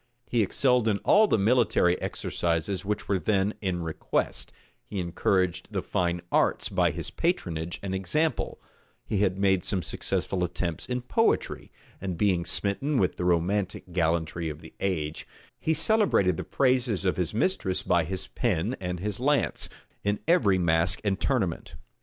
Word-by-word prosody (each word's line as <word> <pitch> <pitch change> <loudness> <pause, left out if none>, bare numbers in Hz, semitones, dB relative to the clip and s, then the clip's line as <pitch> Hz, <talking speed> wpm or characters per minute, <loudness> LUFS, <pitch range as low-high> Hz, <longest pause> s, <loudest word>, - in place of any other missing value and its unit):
He 120 - +1
excelled 125 +3 +2
in 105 -2 +2
all 215 +1 +6
the - - +3
military 105 -5 +3
exercises 85 +2 -2
which 105 +1 -3
were 100 -2 +1
then 100 +3 +1
in 90 -4 -1
request: 80 -1 -2 0.3
he 105 - -7
encouraged 90 0 0
the - - -1
fine 85 -1 -1
arts - - +2
by - - +2
his - - -4
patronage 85 - -2
and 95 -1 -3
example: 150 - -1 0.5
he 105 - -1
had 95 -2 +2
made 95 -2 +2
some 95 -4 -1
successful 90 +2 -2
attempts 85 -1 -3
in 125 -1 -2
poetry; 225 - 0 0.3
and 95 -3 -3
being 90 -4 +2
smitten 130 - 0
with 95 -7 +1
the 90 - -2
romantic 90 +2 0
gallantry 85 -1 0
of 75 - -7
the - - -13
age, 80 -5 -2 0.3
he 160 - 0
celebrated 200 - +3
the - - -4
praises 125 -1 +1
of 90 - +1
his 90 -3 0
mistress 105 - 0
by 85 -1 +3
his 95 +3 -4
pen 105 +1 -1
and 90 -2 -3
his 105 +1 -2
lance, 145 +3 +1 0.3
in 100 0 0
every 115 - +4
masque 85 +1 +2
and 100 -2 0
tournament. 105 -11 -1
95 Hz, 160 wpm, -27 LUFS, 90-110 Hz, 0.5 s, all